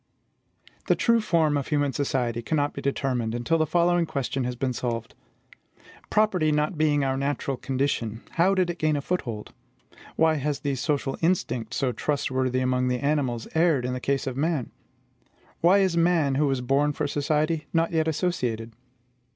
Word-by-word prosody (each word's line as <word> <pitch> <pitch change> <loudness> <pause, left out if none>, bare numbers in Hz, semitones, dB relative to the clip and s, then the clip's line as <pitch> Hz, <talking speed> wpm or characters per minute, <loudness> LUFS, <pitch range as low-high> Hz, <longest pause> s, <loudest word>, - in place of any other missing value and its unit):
The - - +4
true 235 -1 +3
form 160 -7 +2
of 140 - -3
human 145 -2 0
society 125 -5 -1
cannot 145 +3 0
be - - -6
determined 125 -4 -1
until 120 +8 0
the 155 - +2
following 175 +1 +2
question 135 -2 -2
has 125 0 -3
been 130 0 -1
solved: 115 -2 -3 1.0
Property 190 -8 +2
not 150 +4 0
being 150 -2 +2
our 135 -1 0
natural 140 0 -2
condition, 130 -4 -2
how 185 +4 +3
did 185 -2 +1
it 170 - -10
gain 155 -1 +2
a 145 - -1
foothold? 120 -11 -4 0.6
Why 160 -1 +3
has 145 0 -2
the 140 -1 -1
social 135 0 -1
instinct, 160 -10 0
so 130 -2 0
trustworthy 130 -2 -1
among 125 0 +1
the 125 0 +1
animals, 135 -5 -1
erred 160 -6 +2
in 125 - -2
the 130 - -3
case 135 +1 -1
of 130 -2 -3
man? 150 -2 -1 0.9
Why 180 +4 +5
is 190 -3 +2
man, 165 -4 +3
who 145 +2 +2
was 135 -2 0
born 140 +4 +1
for 150 - -2
society, 150 +2 0
not 165 0 +1
yet 160 -1 +1
associated? 125 -10 -2
145 Hz, 170 wpm, -26 LUFS, 130-160 Hz, 1.0 s, Why